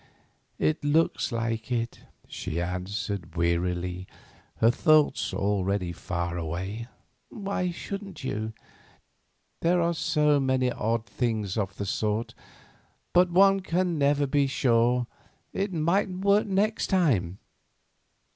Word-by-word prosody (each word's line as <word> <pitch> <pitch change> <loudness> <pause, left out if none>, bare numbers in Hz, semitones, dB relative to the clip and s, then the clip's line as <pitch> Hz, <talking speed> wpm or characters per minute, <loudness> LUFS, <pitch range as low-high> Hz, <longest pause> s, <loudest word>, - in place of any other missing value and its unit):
"It 155 -1 0
looks 150 0 +2
like 115 0 -2
it," 115 -1 -2 0.3
she 85 - -4
answered, 90 0 -4
wearily, 90 +2 -1 0.5
her 115 - +4
thoughts 155 +2 +3
already 100 -2 0
far 85 0 -3
away. 95 +8 -4 0.4
"Why 195 -3 -2
shouldn't 195 -1 -7
you? 110 -4 -3 1.1
There 175 +2 +2
are 170 0 +2
so 150 -3 +2
many 130 -2 +1
odd 115 0 -1
things 110 -7 -2
of 100 -3 -2
the 100 - -3
sort. 105 +3 -1 0.8
But 180 0 +5
one 195 +2 +5
can 180 -3 -1
never 145 0 +3
be 140 0 +2
sure; 125 -2 +2 0.5
it 195 0 -1
mightn't 185 +3 0
work 200 +2 +4
next 210 +3 +1
time." 115 - +1
125 Hz, 115 wpm, -27 LUFS, -, 1.1 s, But